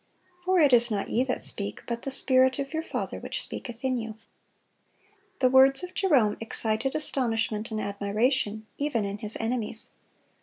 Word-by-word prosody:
For 370 0 +3
it 290 -5 +5
is 240 0 +5
not 205 -3 -2
ye 245 - +3
that 255 - -2
speak, 200 0 -2
but 235 0 -3
the 275 - -4
Spirit 260 -1 +4
of 275 +2 -4
your 320 - 0
Father - - -4
which - - -4
speaketh 240 +1 -7
in 255 -2 +1
you."(148) 220 -1 -6 1.2
The 255 - +5
words 270 +4 +6
of 360 0 -6
Jerome 275 - +3
excited 225 +3 -1
astonishment 230 -7 -1
and 220 -1 -3
admiration, 215 +2 0
even 280 -7 0
in 200 +1 -4
his 210 +1 -3
enemies. 225 -1 -3
240 Hz, 165 wpm, -27 LUFS, 215-270 Hz, 1.2 s, words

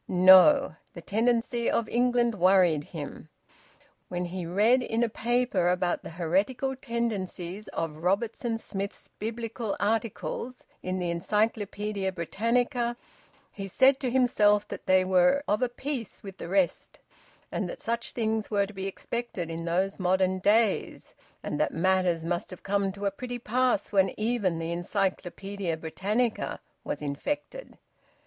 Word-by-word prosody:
No! 190 +11 +7 0.2
The 170 - -7
tendencies 235 +3 +1
of 230 - 0
England 240 -1 +2
worried 180 -5 +4
him. 155 -1 -8 0.8
When 180 0 -3
he 175 -1 -5
read 215 +8 +4
in 230 -1 0
a 235 - +1
paper 235 -5 +1
about 180 -1 0
the - - -8
heretical 195 +11 0
tendencies 215 -6 -3
of 165 -2 -4
Robertson 220 +6 -1
Smith's 200 -2 -6
Biblical 225 0 -3
articles 225 +3 -2 0.2
in 185 0 -2
the 175 -2 -1
"Encyclopaedia 205 +1 -1
Britannica," 235 - 0 0.5
he 195 -1 -6
said 260 +7 +4
to 260 - -1
himself 215 -5 +3
that - - -8
they 185 0 +4
were 185 +9 +4
of 210 +4 +1
a 250 - +2
piece 250 -3 -5
with 195 -2 -9
the - - -6
rest, 190 -2 0 0.5
and - - -2
that - - -7
such 235 0 -3
things 220 -2 -1
were 200 -2 +2
to 205 - -11
be 190 0 -4
expected 195 -4 -4
in 165 +1 -5
those 185 +4 0
modern 185 0 +2
days, 210 +2 +1 0.3
and - - -3
that - - 0
matters 180 -1 +2
must 175 +1 -2
have 185 - -10
come 200 0 0
to 200 +1 -6
a 200 - +2
pretty 245 +4 -5
pass 245 -2 0
when 195 -1 +2
even 215 -6 0
the 165 0 -3
"Encyclopaedia 190 0 -2
Britannica" 205 +9 -1 0.2
was - - -4
infected. 290 - -4
200 Hz, 145 wpm, -28 LUFS, 185-235 Hz, 0.8 s, No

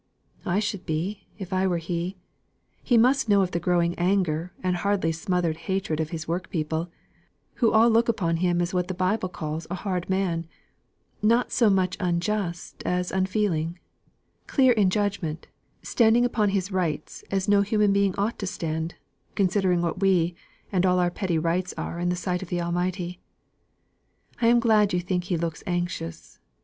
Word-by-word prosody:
"I 175 +2 +1
should 205 -3 -2
be, 175 +6 -3
if 190 -2 -6
I 185 +1 +2
were 175 -2 +1
he. 170 +3 -3 0.6
He 245 - +3
must 255 +1 +3
know 200 -1 +5
of 180 - -2
the 170 - -1
growing 175 0 +1
anger 175 -2 +1
and 180 -1 +1
hardly 195 -3 +1
smothered 170 -1 -1
hatred 190 -5 -1
of 160 -1 -1
his 165 -1 -5
workpeople, 165 -1 -2 0.7
who 230 - +5
all 225 +1 +6
looked 235 +1 +3
upon 170 -7 +1
him 175 0 +1
as 175 - -3
what 180 -1 0
the 185 - -4
Bible 185 +1 0
calls 155 -2 -5
a 180 - -2
'hard 185 -2 -3
man,' 180 -4 0 0.7
not 230 +4 +3
so 235 -4 +4
much 185 -2 +1
unjust 175 0 -2
as 180 0 -1
unfeeling; 185 -4 0 0.7
clear 260 -3 +4
in 205 -5 +3
judgment, 190 -6 -2 0.4
standing 235 +1 +4
upon 215 -4 +1
his 195 0 -1
'rights' 165 -5 -2
as 195 0 -1
no 205 -1 +5
human 210 0 +2
being 200 -2 +2
ought 205 +4 -1
to 195 - -3
stand, 165 -3 -3 0.4
considering 185 -2 +2
what 170 +1 -2
we 180 -3 +3 0.4
and 185 -3 +2
all 180 -1 +3
our 175 -1 +2
petty 175 -2 -1
rights 170 +3 -1
are 170 - -4
in 175 0 0
the 180 - +1
sight 180 0 -2
of 190 - -7
the 175 - -1
Almighty. 175 +1 -2 1.2
I 230 - +4
am 240 +1 +6
glad 215 -4 +3
you 180 - +2
think 180 0 -2
he 180 -2 -1
looks 165 -1 -3
anxious. 175 - -4
185 Hz, 175 wpm, -25 LUFS, 170-200 Hz, 1.2 s, all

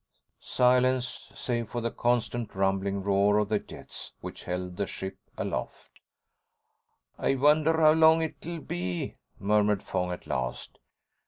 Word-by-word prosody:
Silence, 125 0 +1
save 120 -3 -2
for 120 - -3
the 115 0 -2
constant, 120 -2 -1
rumbling 95 0 0
roar 100 +1 +3
of 105 -1 +1
the 105 -1 +2
jets - - -10
which - - -8
held 90 0 -4
the 100 +1 -2
ship 95 0 -6 0.2
aloft. - - -4 1.3
"I 135 - +2
wonder 155 +4 +4
how 155 -1 +7
long 160 0 +6
it'll 160 +1 -5
be," 90 -4 -4 0.2
murmured 105 0 +2
Fong 90 0 -2
at 90 - -6
last. 65 -1 -4
105 Hz, 135 wpm, -28 LUFS, 95-130 Hz, 1.3 s, how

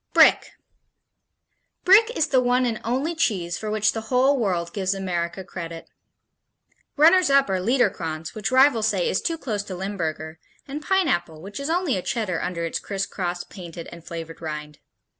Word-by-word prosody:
Brick - - +5 1.3
Brick 415 +5 +7
is 305 - +1
the 260 -2 +4
one 250 +1 +2
and 230 -3 -2
only 265 +8 -1
cheese 190 - -1
for 215 - -4
which 210 0 +2
the 225 - -4
whole 265 +2 +3
world 175 -6 -1
gives 195 -1 -1
America 180 -1 -3
credit. 165 -3 -8 1.1
Runners 335 +3 +6
up 275 0 +5
are 190 - +1
Liederkranz, 180 -8 0
which 215 0 -2
rivals 260 -4 +5
say 195 -5 0
is - - 0
too 330 -1 -1
close 220 -9 -3
to 195 -2 -7
Limburger, 165 -4 -4 0.3
and 285 +2 -5
Pineapple, 175 - 0
which 195 - -8
is 280 +2 -3
only 335 - +1
a - - -2
Cheddar 195 -5 -2
under 170 -2 -3
its 165 - -2
crisscrossed, 185 -3 -4
painted 170 -3 -9
and 170 -1 -11
flavored 165 -1 -8
rind. 150 -2 -6
200 Hz, 165 wpm, -24 LUFS, 170-260 Hz, 1.3 s, Brick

